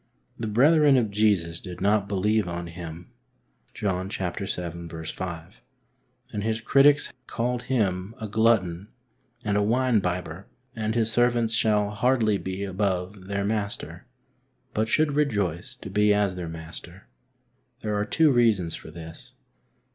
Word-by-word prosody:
The 115 - -2
brethren 145 +5 +5
of 110 -5 +1
Jesus 100 -6 +1
did 90 -2 -8
not 100 +1 +2
believe 105 +1 +1
on 85 0 -4
Him 85 0 -9 0.6
{John 95 -2 -1
vii. 95 -1 -3
5), 85 0 -6 0.7
and 105 - -2
His 110 0 0
critics 140 +5 +4
called 120 +1 -1
Him 105 -5 -1
a 110 - -4
glutton 105 -4 +2 0.6
and 105 -1 +1
a - - +3
wine 120 +2 +3
bibber, 90 -1 -3 0.3
and 110 0 -2
His 115 -1 +1
servants 120 -1 +2
shall 105 -2 +2
hardly 110 -2 +2
be 95 +1 -4
above 95 -1 -2
their 100 0 -1
Master, 105 -1 -3 0.7
but 110 +1 0
should 155 +4 +3
rejoice 105 - -1
to - - -9
be 105 +1 +4
as 100 -2 +1
their 90 -2 -5
Master. 80 +3 -10 0.7
There 105 -1 -2
are 105 - +1
two 155 +7 +3
reasons 110 -9 +3
for - - -8
this. 80 0 -11
105 Hz, 140 wpm, -26 LUFS, 90-110 Hz, 0.7 s, brethren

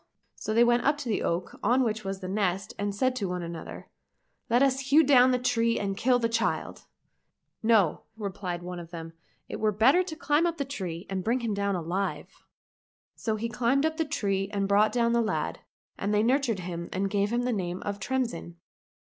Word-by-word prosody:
so - - -5
they 230 +2 +5
went 240 0 +3
up 290 +1 +2
to 290 -4 -6
the 215 - 0
oak 170 +2 -2
on 245 +5 +3
which 220 -2 -1
was 195 0 -4
the 185 - -5
nest 195 -1 -1
and 205 0 -2
said 255 +5 +2
one 180 -2 -2
to - - -4
another, 170 -1 -8 0.3
" - - -48
Let 240 +3 +4
us 270 -1 +2
hew 310 +3 +7
down 260 -3 +6
the 250 - +3
tree 230 -2 +1
and 195 -1 -2
kill 250 +4 +3
the 230 -2 +1
child! 230 0 -2 0.2
" - - -49 0.2
— - - -59
" - - -52
No," 220 -7 +3 0.2
replied 190 -4 -4
one 180 0 -6
of 170 -1 -9
them, 165 -1 -8 0.2
" - - -41
it - - -6
were 215 0 +2
better 235 - +4
to 350 -3 -5
climb 310 +1 +2
up 335 -1 -2
the 280 - -2
tree 185 -10 -5
and 190 -1 -3
bring 240 +5 +1
him 230 -3 -1
down 200 -1 0
alive." 180 +3 -4 0.7
So 220 -2 -2
he 220 +2 -2
climbed 245 +5 +1
up 315 0 -1
the 325 - +2
tree 195 -9 -1
and 200 -1 -1
brought 205 +2 +4
down 235 -1 +2
the 235 - +3
lad, 220 - -2 0.4
and 200 - -1
they 210 0 +3
nurtured 245 -4 +1
him 170 -1 -5
and 195 +1 -1
gave 200 +1 0
him 240 +1 0
the 250 0 0
name 180 -3 -3
of 205 0 -4
Tremsin. 235 -8 -3
215 Hz, 225 wpm, -28 LUFS, 195-245 Hz, 0.7 s, hew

